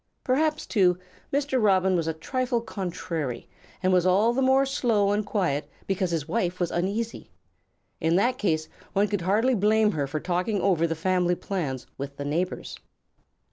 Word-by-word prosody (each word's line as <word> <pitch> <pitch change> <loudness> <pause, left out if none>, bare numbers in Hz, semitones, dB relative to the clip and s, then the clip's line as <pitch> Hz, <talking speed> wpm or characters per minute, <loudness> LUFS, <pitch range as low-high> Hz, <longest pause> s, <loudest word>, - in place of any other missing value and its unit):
Perhaps, 305 +4 +1
too, 180 -5 +3 0.3
Mr. 275 -2 +1
Robin 190 -3 +3
was 165 -2 0
a 160 - 0
trifle 250 +8 -1
contrary 170 - -4 0.4
and 185 0 +3
was 180 -1 +4
all 200 +6 +3
the 265 - 0
more 265 +1 +4
slow 230 -7 +1
and 210 +1 +1
quiet 180 -9 -1 0.2
because 190 -1 0
his 165 -3 -2
wife 180 -1 -1
was 175 -2 0
uneasy. 205 +6 -2 0.7
In 160 +1 +2
that 245 +7 +2
case 155 -6 0 0.3
one 200 +2 +3
could 205 -3 -2
hardly 215 +8 +2
blame 215 0 +3
her 145 -6 -2
for 155 +3 -3
talking 180 +5 -1
over 175 -4 +2
the 165 - -2
family 180 +1 +1
plans 150 -11 -3
with 140 0 -6
the 140 - -4
neighbors. 170 +6 -3
190 Hz, 170 wpm, -26 LUFS, 170-220 Hz, 0.7 s, was